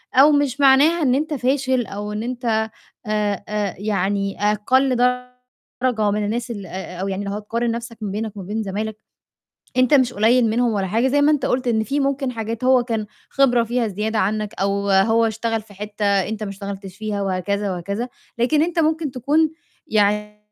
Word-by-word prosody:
أو 275 Hz, +4 st, +7 dB
مش 285 Hz, -2 st, +1 dB
معناها 285 Hz, +5 st, +5 dB
إن 255 Hz, -3 st, +3 dB
أنت 305 Hz, +3 st, -1 dB
فاشل 260 Hz, -2 st, +1 dB
أو 205 Hz, +1 st, -5 dB
إن 210 Hz, +1 st, -3 dB
أنت 230 Hz, -3 st, -1 dB, 0.4 s
آآ، 210 Hz, -2 st, -1 dB
آآ 210 Hz, -2 st, -2 dB
يعني 200 Hz, -1 st, -1 dB
أقَل 255 Hz, +5 st, +2 dB, 0.9 s
درجة 220 Hz, -5 st, +1 dB
من 210 Hz, 0 st, -1 dB
الناس 235 Hz, +3 st, -2 dB
ال 205 Hz, -4 st, -6 dB
آآ 180 Hz, 0 st, -7 dB
أو 195 Hz, -, -1 dB
يعني 195 Hz, +1 st, -3 dB
لو 200 Hz, -, -3 dB
هتقارن 230 Hz, +3 st, -2 dB
نَفْسك 235 Hz, 0 st, -6 dB
ما 205 Hz, -2 st, -3 dB
بينك 215 Hz, +1 st, -4 dB
وما 195 Hz, -, -6 dB
بين 215 Hz, +3 st, -3 dB
زمايلك، 210 Hz, +2 st, -4 dB, 0.8 s
أنت 255 Hz, +2 st, +4 dB
مش 260 Hz, -3 st, +4 dB
قليّل 230 Hz, +2 st, +3 dB
منهم 235 Hz, +1 st, +1 dB
ولا 195 Hz, -2 st, -1 dB
حاجة، 225 Hz, +7 st, +1 dB
زي 285 Hz, +2 st, +2 dB
ما 295 Hz, +1 st, +5 dB
أنت 295 Hz, -4 st, +1 dB
قُلت 250 Hz, 0 st, 0 dB
إن 220 Hz, -2 st, +2 dB
في 275 Hz, +7 st, -1 dB
ممكن 275 Hz, -1 st, 0 dB
حاجات 230 Hz, 0 st, -4 dB
هو 255 Hz, -1 st, +4 dB
كان 225 Hz, -3 st, -2 dB, 0.2 s
خبرة 245 Hz, -4 st, +3 dB
فيها 235 Hz, 0 st, 0 dB
زيادة 215 Hz, +2 st, -2 dB
عنّك 210 Hz, +1 st, -1 dB
أو 200 Hz, +1 st, 0 dB
هو 225 Hz, +4 st, +4 dB
اشتغل 225 Hz, 0 st, -1 dB
في 205 Hz, -, -17 dB
حتّة 210 Hz, +1 st, -4 dB
أنت 200 Hz, +2 st, +1 dB
ما 205 Hz, -, -4 dB
اشتغلتش 195 Hz, -1 st, -7 dB
فيها 215 Hz, -2 st, -3 dB
وهكذا 195 Hz, +1 st, -1 dB
وهكذا، 200 Hz, +7 st, -3 dB, 0.3 s
لكن 295 Hz, +6 st, +3 dB
أنت 340 Hz, 0 st, -1 dB
ممكن 315 Hz, -2 st, +1 dB
تكون 295 Hz, +5 st, +1 dB, 0.4 s
يعني 210 Hz, 0 st, +1 dB
220 Hz, 185 wpm, -21 LUFS, 205-255 Hz, 0.9 s, أو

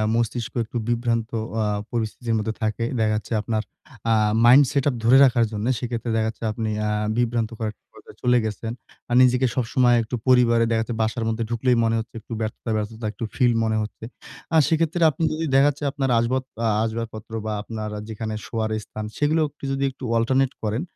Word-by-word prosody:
মস্তিষ্ক 115 Hz, +1 st, -1 dB
একটু 115 Hz, +2 st, -6 dB
বিভ্রান্ত 115 Hz, -1 st, 0 dB, 0.3 s
আ -, -, +1 dB, 0.3 s
পরিস্থিতির 115 Hz, 0 st, -2 dB
মধ্যে 110 Hz, +1 st, -2 dB
থাকে। 110 Hz, +1 st, -1 dB, 0.2 s
দেখা 110 Hz, -1 st, +2 dB
যাচ্ছে 110 Hz, +2 st, -4 dB
আপনার 110 Hz, 0 st, -1 dB, 0.5 s
আ -, -, +5 dB, 0.3 s
মাইন্ড 130 Hz, +4 st, +8 dB
সেটআপ 140 Hz, -2 st, +1 dB
ধরে 120 Hz, +4 st, +6 dB
রাখার 120 Hz, -3 st, +3 dB
জন্য। 105 Hz, 0 st, -3 dB
সেক্ষেত্রে 120 Hz, -1 st, -3 dB
দেখাচ্ছে 110 Hz, 0 st, -2 dB
আপনি 110 Hz, 0 st, -3 dB
অ্যা 105 Hz, -, 0 dB, 0.3 s
বিভ্রান্তকর 115 Hz, -2 st, -1 dB
একটা 105 Hz, -, -28 dB
পর্যায় -, -, -15 dB
চলে 125 Hz, 0 st, +4 dB
গেছেন। 110 Hz, +1 st, -4 dB, 0.4 s
আর 120 Hz, -, +1 dB
নিজেকে 125 Hz, 0 st, +4 dB
সবসময় 125 Hz, 0 st, +3 dB
একটু 115 Hz, +2 st, -4 dB
পরিবারে 120 Hz, -2 st, +5 dB
দেখা 110 Hz, -1 st, +2 dB
যাচ্ছে 115 Hz, +1 st, -4 dB
বাসার 110 Hz, +2 st, -1 dB
মধ্যে 115 Hz, +1 st, -1 dB
ঢুকলেই 120 Hz, +1 st, +1 dB
মনে 115 Hz, 0 st, +2 dB
হচ্ছে 115 Hz, -, -7 dB
একটু 115 Hz, +2 st, -9 dB
ব্যর্থতা, 110 Hz, +1 st, -4 dB
ব্যর্থতা 110 Hz, +2 st, -4 dB
একটু 110 Hz, -, -8 dB
ফিল 125 Hz, -2 st, +4 dB
মনে 110 Hz, -1 st, +1 dB
হচ্ছে। 105 Hz, +1 st, -7 dB, 0.5 s
আ -, -, +7 dB
সেক্ষেত্রে 165 Hz, +2 st, +1 dB
আপনি 150 Hz, -, -4 dB
যদি 160 Hz, +1 st, -2 dB
দেখা 135 Hz, +1 st, +6 dB
যাচ্ছে 145 Hz, +1 st, -6 dB
আপনার 135 Hz, -2 st, -1 dB
আসবাব 130 Hz, +3 st, 0 dB, 0.2 s
আ -, -, +3 dB, 0.2 s
আসবাবপত্র 115 Hz, 0 st, -5 dB
বা 110 Hz, -, -2 dB
আপনার 110 Hz, 0 st, -5 dB, 0.2 s
যেখানে 110 Hz, 0 st, -4 dB
শোয়ার 110 Hz, -1 st, -2 dB
স্থান, 110 Hz, -, -6 dB
সেগুলোও 155 Hz, +1 st, +2 dB
একটু 145 Hz, -, -32 dB
যদি 135 Hz, 0 st, -1 dB
একটু 135 Hz, -, -14 dB
অল্টারনেট 130 Hz, +3 st, +2 dB
করেন। 110 Hz, +4 st, -1 dB
115 Hz, 185 wpm, -23 LUFS, 110-125 Hz, 0.5 s, মাইন্ড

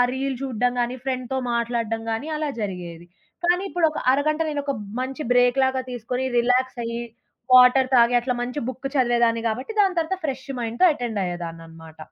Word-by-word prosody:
Reel 270 Hz, -1 st, -2 dB
జూడ్డం 245 Hz, -1 st, 0 dB
గాని, 245 Hz, +2 st, -3 dB
ఫ్రెండ్‌తో 255 Hz, 0 st, -2 dB
మాట్లాడ్డం 230 Hz, -1 st, -1 dB
గాని, 275 Hz, +8 st, -3 dB
అలా 305 Hz, -1 st, -1 dB
జరిగేది. 175 Hz, -3 st, -6 dB, 0.4 s
కానీ, 355 Hz, +2 st, +3 dB
ఇప్పుడొక 320 Hz, -3 st, +1 dB, 0.2 s
అరగంట 305 Hz, +3 st, 0 dB
నేనొక 285 Hz, -2 st, -2 dB, 0.3 s
మంచి 270 Hz, +3 st, -5 dB
బ్రేక్ 245 Hz, +1 st, +4 dB
లాగా 260 Hz, 0 st, -1 dB
తీసుకొని, 245 Hz, +2 st, -3 dB, 0.2 s
రిలాక్స్ 250 Hz, +1 st, +1 dB
అయ్యి, 235 Hz, +1 st, -3 dB, 0.5 s
వాటర్ 255 Hz, +1 st, +7 dB
తాగి, 240 Hz, 0 st, +5 dB
అట్లా 250 Hz, +1 st, -2 dB
మంచి 250 Hz, +4 st, -4 dB
బుక్ 260 Hz, +2 st, -4 dB
చదివేదాన్ని 235 Hz, -3 st, +2 dB
గాబట్టి, 255 Hz, -, -4 dB
దాని 375 Hz, -3 st, +2 dB
తర్వాత 355 Hz, +4 st, -2 dB
ఫ్రెష్ 265 Hz, -1 st, -4 dB
మైండ్‌తో 235 Hz, +8 st, 0 dB
అటెండ్ 235 Hz, -7 st, -3 dB
అయ్యేదాన్ననమాట. 165 Hz, -2 st, -8 dB
250 Hz, 155 wpm, -23 LUFS, 230-270 Hz, 0.5 s, వాటర్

